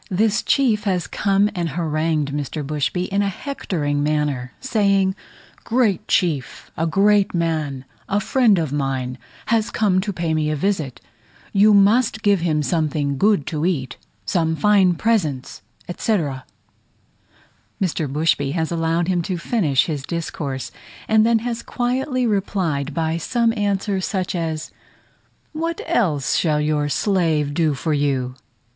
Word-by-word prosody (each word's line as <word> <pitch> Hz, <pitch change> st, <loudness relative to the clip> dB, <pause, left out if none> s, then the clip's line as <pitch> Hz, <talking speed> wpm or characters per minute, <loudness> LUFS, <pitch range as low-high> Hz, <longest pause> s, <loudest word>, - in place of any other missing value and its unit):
This 215 Hz, +4 st, +2 dB
chief 225 Hz, -6 st, +2 dB
has 180 Hz, -4 st, 0 dB
come 200 Hz, +2 st, +1 dB
and 175 Hz, -4 st, -2 dB
harangued 155 Hz, -2 st, -1 dB
Mr. 145 Hz, +1 st, -4 dB
Bushby 150 Hz, +5 st, -1 dB
in 200 Hz, +1 st, +1 dB
a 200 Hz, -, +1 dB
hectoring 165 Hz, -, -3 dB
manner, 145 Hz, -4 st, -1 dB
saying, 200 Hz, -6 st, +2 dB, 0.5 s
"great 230 Hz, -5 st, +1 dB
chief, 155 Hz, -8 st, -1 dB
a 165 Hz, -, 0 dB
great 200 Hz, +2 st, +3 dB
man, 155 Hz, -6 st, -1 dB, 0.2 s
a 205 Hz, 0 st, +2 dB
friend 225 Hz, -2 st, +3 dB
of 155 Hz, -5 st, -1 dB
mine, 130 Hz, -3 st, -2 dB, 0.3 s
has 225 Hz, -1 st, +1 dB
come 195 Hz, -5 st, +2 dB
to 205 Hz, +1 st, -3 dB
pay 170 Hz, -3 st, -2 dB
me 155 Hz, -1 st, 0 dB
a 155 Hz, -, 0 dB
visit 155 Hz, -5 st, -2 dB, 0.5 s
you 205 Hz, +1 st, +5 dB
must 220 Hz, +2 st, +3 dB
give 205 Hz, -3 st, +4 dB
him 155 Hz, -3 st, 0 dB
something 150 Hz, -4 st, -1 dB
good 200 Hz, -8 st, +3 dB
to 155 Hz, -1 st, -3 dB
eat, 160 Hz, -8 st, -1 dB, 0.3 s
some 160 Hz, -4 st, +1 dB
fine 195 Hz, -1 st, +4 dB
presents, 160 Hz, -, -1 dB, 0.3 s
etc." 160 Hz, -, -1 dB, 1.3 s
Mr. 160 Hz, -6 st, -1 dB
Bushby 145 Hz, -2 st, +1 dB
has 160 Hz, -1 st, -1 dB
allowed 165 Hz, 0 st, 0 dB
him 180 Hz, -2 st, +1 dB
to 180 Hz, +2 st, -3 dB
finish 170 Hz, -, +1 dB
his 150 Hz, -4 st, -3 dB
discourse, 145 Hz, -4 st, -4 dB, 0.4 s
and 220 Hz, 0 st, +4 dB
then 230 Hz, -1 st, +4 dB
has 235 Hz, -1 st, -2 dB
quietly 255 Hz, +2 st, -1 dB
replied 180 Hz, -, -1 dB
by 160 Hz, 0 st, 0 dB
some 230 Hz, +7 st, +1 dB
answer 200 Hz, -2 st, 0 dB
such 185 Hz, -1 st, -2 dB
as, 160 Hz, -3 st, -3 dB, 0.8 s
"What 330 Hz, +2 st, -3 dB
else 180 Hz, -, +1 dB
shall 155 Hz, -3 st, +1 dB
your 150 Hz, -1 st, 0 dB
slave 160 Hz, -6 st, +1 dB
do 155 Hz, -2 st, +1 dB
for 155 Hz, +3 st, -1 dB
you?" 135 Hz, -3 st, 0 dB
170 Hz, 140 wpm, -21 LUFS, 150-205 Hz, 1.3 s, you